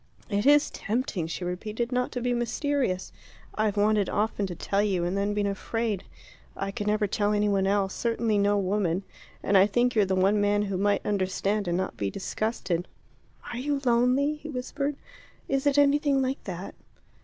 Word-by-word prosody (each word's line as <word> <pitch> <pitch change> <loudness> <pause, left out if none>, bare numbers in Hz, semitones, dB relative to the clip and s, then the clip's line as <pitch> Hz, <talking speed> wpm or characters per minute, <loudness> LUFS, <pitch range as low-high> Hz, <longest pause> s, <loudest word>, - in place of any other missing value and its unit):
"It 205 +5 +1
is 295 0 +5
tempting," 215 - -2
she 175 +2 -4
repeated, 215 +7 -3
"not 250 0 0
to 250 - -3
be 245 0 0
mysterious. 240 -4 -1 0.4
I've 215 -1 0
wanted 205 -1 +3
often 210 -1 0
to 175 - -6
tell 200 +4 0
you, 195 -4 0
and 175 +2 -1
then 200 +1 0
been 205 -1 +1
afraid. 205 +1 -2 0.5
I 195 0 -2
could 205 +1 -4
never 210 0 +2
tell 205 +1 0
any 210 0 +2
one 195 -1 +2
else, 195 -1 +1
certainly 230 -2 0
no 205 0 +3
woman, 195 -2 0 0.4
and 200 - +1
I 195 +1 +7
think 245 +4 +2
you're 210 -3 +4
the 190 0 0
one 195 +3 +3
man 205 0 +2
who 195 -2 -2
might 200 0 +1
understand 200 0 0
and 175 0 +1
not 185 0 -3
be 100 - -1
disgusted." 190 - -2 0.7
"Are 240 - -4
you 285 +2 -1
lonely?" 250 +5 +3
he 310 +1 -9
whispered. 280 +2 -3 0.5
"Is 275 +1 0
it 285 0 +3
anything 285 -1 +4
like 265 +1 -2
that?" 185 0 -6
210 Hz, 185 wpm, -27 LUFS, 195-245 Hz, 0.7 s, I